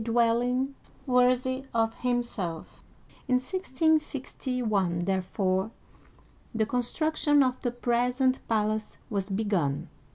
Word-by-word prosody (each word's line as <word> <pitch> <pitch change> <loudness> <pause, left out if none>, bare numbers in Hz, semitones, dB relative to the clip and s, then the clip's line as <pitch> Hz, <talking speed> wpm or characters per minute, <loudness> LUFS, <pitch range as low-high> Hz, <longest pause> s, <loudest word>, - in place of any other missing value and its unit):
dwelling 240 +3 +2 0.3
worthy 255 +1 +2
of 225 -1 +2
himself. 235 -9 -3 0.4
In 255 - +3
1661, 255 - 0
therefore, 190 +1 0 0.9
the 220 -1 +2
con 245 +3 0
struction 295 +2 +2
of 255 -1 0
the 245 - 0
present 245 +2 +1
palace 215 -1 0
was 200 -1 -1
begun. 190 -9 0
240 Hz, 95 wpm, -28 LUFS, 210-255 Hz, 0.9 s, In